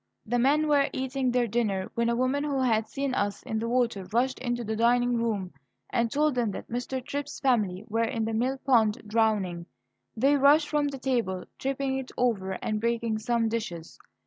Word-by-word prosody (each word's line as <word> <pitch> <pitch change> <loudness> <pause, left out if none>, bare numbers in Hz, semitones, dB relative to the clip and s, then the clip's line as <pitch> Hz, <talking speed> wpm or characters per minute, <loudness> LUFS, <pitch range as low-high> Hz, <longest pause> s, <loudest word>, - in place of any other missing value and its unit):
The 245 +2 0
men 295 +5 +3
were 285 -2 +3
eating 260 0 -1
their 245 0 +2
dinner 205 -4 -1
when 235 0 +1
a 235 - +1
woman 255 +4 +1
who 285 -2 -1
had 225 -4 +2
seen 275 -1 -2
us 205 -4 -1
in 220 - -2
the 230 +1 -2
water 235 -6 0
rushed 255 +4 +1
into 240 -1 -2
the 220 0 -2
dining 245 +2 +3
room 215 -7 -1 0.4
and 235 -2 +1
told 300 +1 +2
them 240 -3 0
that - - -8
Mr. 250 +1 -3
Tripp's 285 +1 -4
family 215 -8 +1
were 225 +2 0
in 225 0 -2
the 225 - -2
mill 255 +4 0
pond 230 -6 +2
drowning. 210 -6 0 0.5
They 275 +5 +4
rushed 290 +2 +5
from 295 -1 +1
the 280 -1 -4
table, 235 -9 -1
tipping 270 0 -1
it 265 - -7
over 205 -6 0
and 215 -1 -1
breaking 230 -1 0
some 230 +1 +1
dishes. 180 -8 -5
240 Hz, 195 wpm, -27 LUFS, 220-265 Hz, 0.5 s, rushed